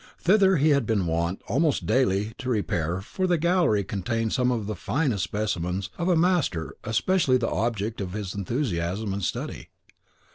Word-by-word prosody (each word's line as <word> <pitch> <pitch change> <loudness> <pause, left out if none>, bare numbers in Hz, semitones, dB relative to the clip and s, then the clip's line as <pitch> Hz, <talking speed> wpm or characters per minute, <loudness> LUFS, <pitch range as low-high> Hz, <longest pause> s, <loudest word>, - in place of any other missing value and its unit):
Thither 190 0 +4
he 150 +2 +3
had 140 -6 +2
been 105 -5 +1
wont, 85 +2 -1
almost 145 +6 +1
daily, 105 -3 +1
to 130 - -4
repair, 90 -6 -1
for 185 - -2
the 175 -1 +3
gallery 170 - +2
contained 110 +4 -2
some 125 -1 +2
of 115 -4 -1
the 110 - -3
finest 125 - -1
specimens 95 -2 -2
of 175 +1 0
a 180 - +4
master 160 - +1
especially 130 - +2
the 115 -2 -1
object 110 -1 -2
of 90 -2 -4
his 100 -3 -4
enthusiasm 100 - -2
and 100 0 -4
study. - - -4
110 Hz, 170 wpm, -26 LUFS, 95-145 Hz, -, Thither